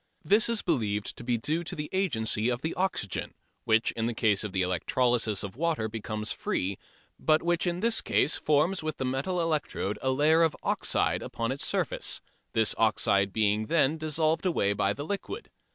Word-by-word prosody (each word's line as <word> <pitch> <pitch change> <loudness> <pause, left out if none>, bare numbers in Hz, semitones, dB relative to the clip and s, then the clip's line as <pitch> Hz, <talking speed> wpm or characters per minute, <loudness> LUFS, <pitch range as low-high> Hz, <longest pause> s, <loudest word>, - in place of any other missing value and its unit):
This 210 +8 +4
is 230 -2 0
believed 105 -3 -1
to - - -8
be 120 -1 0
due 155 +9 -1
to 175 +2 -5
the 150 -2 -4
agency 120 - +1
of 120 +1 -2
the 160 - -1
oxygen 180 - -2 0.3
which 110 +1 +3
in 115 0 -2
the 120 - -3
case 110 -3 +2
of 105 - -4
the 95 0 0
electrolysis 110 +4 +1
of 100 0 -6
water 155 -6 0
becomes 110 0 -4
free, 95 +1 -2 0.4
but 155 0 +3
which 175 +1 +1
in 175 +1 -1
this 230 0 +3
case 150 - +1
forms 155 +5 +1
with 155 -1 -4
the 130 - -2
metal 135 +8 -1
electrode 155 - -1
a 130 - 0
layer 150 +5 +4
of 165 -2 +3
oxide - - +1
upon 115 +1 -3
its 135 - -2
surface, - - -1 0.3
this 110 -1 +2
oxide 100 -3 +3
being 105 +1 +1
then 160 -1 +2
dissolved 155 +1 0
away 100 - +1
by 100 -1 +1
the 125 +8 -5
liquid. 205 - -5
130 Hz, 185 wpm, -28 LUFS, 110-165 Hz, 0.4 s, This